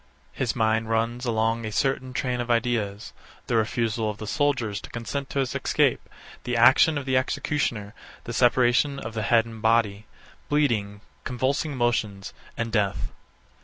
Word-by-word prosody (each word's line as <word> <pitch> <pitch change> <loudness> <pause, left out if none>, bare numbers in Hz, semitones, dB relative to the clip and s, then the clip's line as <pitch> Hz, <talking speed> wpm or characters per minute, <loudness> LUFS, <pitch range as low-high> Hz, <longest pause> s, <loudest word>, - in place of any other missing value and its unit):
His 125 -4 -1
mind 110 -1 +1
runs 115 +2 -1
along 115 0 +1
a 110 - -4
certain 130 +2 0
train 125 -1 -1
of 120 - -5
ideas: 115 -3 -1 0.3
The 120 - -1
refusal 115 0 0
of 105 - -5
the 110 - -7
soldiers 120 -5 0
to - - -10
consent 135 +4 -5
to - - -5
his 130 - -2
escape; - - +1 0.3
the 125 -1 -1
action 135 +6 +6
of 140 - -4
the 130 -1 0
executioner; 130 -5 -1 0.3
the 120 - -6
separation 125 +3 +3
of 110 -4 -6
the 110 - -2
head 115 +2 +3
and 115 -1 -10
body; 110 -2 +2 0.4
bleeding, 110 -9 0 0.2
convulsive 130 +5 -1
motions, 115 -6 -1 0.2
and 115 -1 -2
death. 100 -3 0
115 Hz, 160 wpm, -25 LUFS, 110-130 Hz, 0.4 s, action